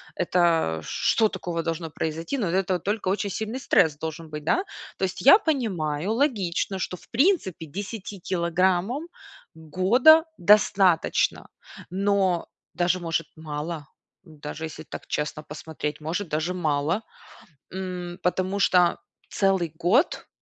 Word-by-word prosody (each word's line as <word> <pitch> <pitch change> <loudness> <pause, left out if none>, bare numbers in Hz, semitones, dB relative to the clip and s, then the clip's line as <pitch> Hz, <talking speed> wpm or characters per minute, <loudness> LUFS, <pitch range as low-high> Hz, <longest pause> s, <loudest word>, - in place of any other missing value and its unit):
это 170 - +1
что 220 - +2
такого 175 -3 -4
должно 165 0 -3
произойти? 160 - -3
Но 205 -7 -1
от 170 - -2
этого 185 -1 +1
только 205 +2 -2
очень 200 +1 0
сильный 220 +6 -4
стресс 160 - +3
должен 160 +1 -6
быть, 150 -1 -7
да? 360 - +1 0.3
То - - -4
есть 185 - -2
я 280 +10 +9
понимаю, 195 - -1
логично, 200 - 0
что, 180 - -3
в - - -21
принципе, 250 - +1
10 200 +4 -7
килограммам 185 - 0 0.5
года 215 - +5
достаточно. 195 -3 +3 0.4
Но 190 -2 +1 0.3
даже, 180 +1 +1
может, 165 -1 -2
мало, 155 -1 -5 0.4
даже 155 -1 -7
если 155 - -8
так - - -9
честно 150 +1 -3
посмотреть, 150 0 -6
может 175 +5 -3
даже 155 +4 -1
мало. 160 +3 0 0.7
М, 180 -2 -5
потому 185 +2 0
что 180 -3 +4 0.3
целый 190 -5 +1
год, 185 - +1
180 Hz, 130 wpm, -25 LUFS, 160-200 Hz, 0.7 s, я